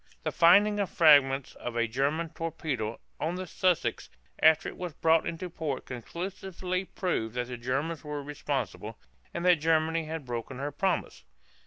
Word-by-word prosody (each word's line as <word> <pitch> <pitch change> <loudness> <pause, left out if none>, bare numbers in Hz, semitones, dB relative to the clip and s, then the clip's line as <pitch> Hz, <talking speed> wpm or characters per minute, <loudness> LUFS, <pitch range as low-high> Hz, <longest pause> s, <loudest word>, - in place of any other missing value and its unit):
The - - -1
finding 205 +5 +5
of 200 - 0
fragments 140 -4 +5
of 120 - -6
a 115 0 +1
German 140 +8 0
torpedo 155 -9 -3 0.2
on 165 +3 -1
the 185 0 -4
"Sussex" 180 0 0 0.3
after 160 0 +5
it - - -6
was 180 -3 -5
brought 160 0 +3
into 170 +2 -4
port 155 -6 -4
conclusively 180 - -4
proved 120 - -2
that 125 0 -2
the 125 - -5
Germans 135 +7 -2
were 150 -1 -5
responsible, 135 -6 -4 0.3
and 170 - -4
that 180 -2 +6
Germany 160 +1 +1
had 160 -2 -5
broken 120 +1 -5
her 140 +2 -3
promise. 175 - -1
155 Hz, 160 wpm, -29 LUFS, 135-170 Hz, 0.3 s, that